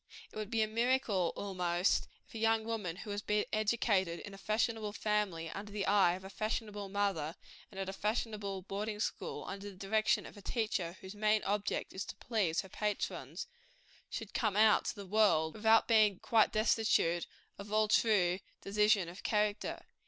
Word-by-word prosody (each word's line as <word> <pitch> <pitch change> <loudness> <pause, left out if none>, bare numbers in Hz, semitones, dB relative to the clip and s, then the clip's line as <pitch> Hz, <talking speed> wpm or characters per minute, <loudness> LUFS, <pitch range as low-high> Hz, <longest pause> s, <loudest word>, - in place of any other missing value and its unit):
It - - -17
would 215 -1 -4
be 225 -1 +2
a - - 0
miracle, 230 -5 +1
almost, 180 -2 0 0.2
if - - -19
a 225 - -5
young 225 0 +2
woman 210 -7 -3
who 210 +2 -7
has 205 0 -2
been 210 0 +1
educated 210 -5 +1
in 200 - -9
a - - -9
fashionable 215 0 0
family, 210 -6 -1
under 205 +1 -7
the 200 -1 -2
eye 195 -4 +4
of 190 - -10
a 190 - -8
fashionable 210 -1 -3
mother, 190 -6 -1 0.3
and 195 - -9
at 195 - -3
a 190 - -4
fashionable 210 -2 -2
boarding 210 +2 -4
school, - - -3
under 200 +1 -6
the 195 - -12
direction 215 +3 +1
of - - -11
a 205 - -11
teacher 195 -6 -2
whose 190 +1 -8
main 215 0 +2
object 205 +1 -1
is 190 - -3
to - - -8
please 205 -9 0
her 190 - -13
patrons, 210 - -3 0.6
should - - -6
come 215 -5 0
out 215 0 +5
to - - -2
the 200 -2 -8
world, 185 -6 +3
without 220 +1 +4
being 215 -4 +5
quite 225 +2 +3
destitute 215 -6 +2 0.3
of 200 +1 -8
all 215 0 +3
true 195 -5 +3 0.2
decision 210 -2 +3
of 175 +3 -9
character. 210 -1 -1
210 Hz, 180 wpm, -34 LUFS, 190-215 Hz, 0.6 s, out